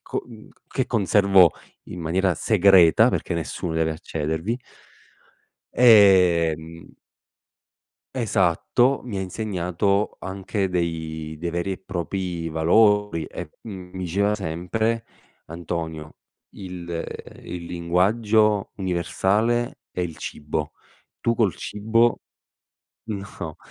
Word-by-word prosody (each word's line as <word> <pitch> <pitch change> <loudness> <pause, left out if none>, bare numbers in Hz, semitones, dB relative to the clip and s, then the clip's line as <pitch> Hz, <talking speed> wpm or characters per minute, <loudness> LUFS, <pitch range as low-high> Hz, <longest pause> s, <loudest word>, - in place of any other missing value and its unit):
co - - -4
mhmm 115 -3 -13
c - - -28 0.2
che - - -4
conservo 100 -5 +4 0.3
in 90 - -8
maniera 90 +3 +1
segreta, 95 -3 +5
perché - - -2
nessuno 85 +1 -4
deve 80 0 0
accedervi 80 +7 -3 1.2
ehm 85 -8 +4 1.3
Esatto, 115 +2 +1
mi 110 -6 -4
ha - - -2
insegnato 100 0 -1
anche 95 +1 -3
dei 80 -3 -3
dei 85 +2 -4
veri 85 +3 -2
e 95 - -6
propri 90 -2 -4
valori 95 +1 +3
e 85 -3 -8
m 95 -5 -8
mi 95 - -8
diceva 100 +4 +1
sempre: 105 +5 -2 0.4
"Antonio, 80 -2 -5 0.4
il, 90 -2 -8
ehm, 85 -1 -7
il 85 -1 -7
linguaggio 105 +5 +2
universale 100 +6 0
è - - -4
il 85 -3 -3
cibo, 75 0 -4 0.5
tu 115 - +1
col 110 -6 +1
cibo", 115 +3 +1 0.8
no, 95 -7 -6
90 Hz, 105 wpm, -23 LUFS, 85-105 Hz, 1.3 s, segreta